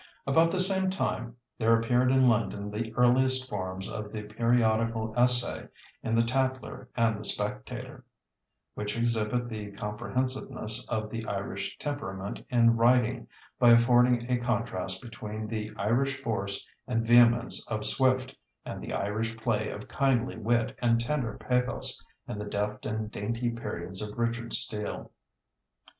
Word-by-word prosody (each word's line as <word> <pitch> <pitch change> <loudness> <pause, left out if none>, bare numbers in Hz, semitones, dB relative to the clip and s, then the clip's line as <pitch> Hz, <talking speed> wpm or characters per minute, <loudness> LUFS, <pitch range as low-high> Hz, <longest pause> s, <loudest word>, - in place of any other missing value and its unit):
About 160 +5 +4
the 185 - -1
same 190 0 +4
time 185 -10 -2 0.2
there 115 0 +4
appeared 125 +2 +2
in 130 -1 +5
London 105 -3 0
the 110 +2 -3
earliest 130 +1 +3
forms 95 -3 -4
of 105 -1 -6
the 110 -1 -5
periodical 115 0 +1
essay 125 0 +3 0.3
in 115 - -1
the 115 - +4
Tatler 130 0 -2
and 110 -3 +2
the - - -7
Spectator, - - -3 0.7
which 105 +1 -3
exhibit 115 +1 +1
the 105 -3 -6
comprehensiveness 115 +2 -1
of 110 -2 -2
the 115 -1 -4
Irish 100 0 -4
temperament 100 -10 -5
in 115 -1 +4
writing 120 0 +3 0.3
by 120 -1 +7
affording 120 0 +4
a 125 - +2
contrast 115 -6 -2
between 110 -2 -6
the 110 -1 -4
Irish 130 +6 +1
force 100 -4 -2 0.2
and 115 -3 0
vehemence 120 +1 +5
of 110 -1 -2
Swift 130 +3 +2 0.3
and - - -6
the - - -6
Irish 110 +3 -2
play 110 -1 -1
of 105 - -7
kindly 130 -3 +1
wit 115 +1 0
and 115 -1 +3
tender 120 -3 -2
pathos 125 0 -1 0.2
in 105 - -5
the 105 - -4
deft 105 +1 -3
and 110 0 -3
dainty 115 +4 -2
periods 95 -5 -5
of 105 +1 -6
Richard 115 0 -1
Steele. 105 -1 -2
115 Hz, 145 wpm, -29 LUFS, 105-125 Hz, 0.7 s, by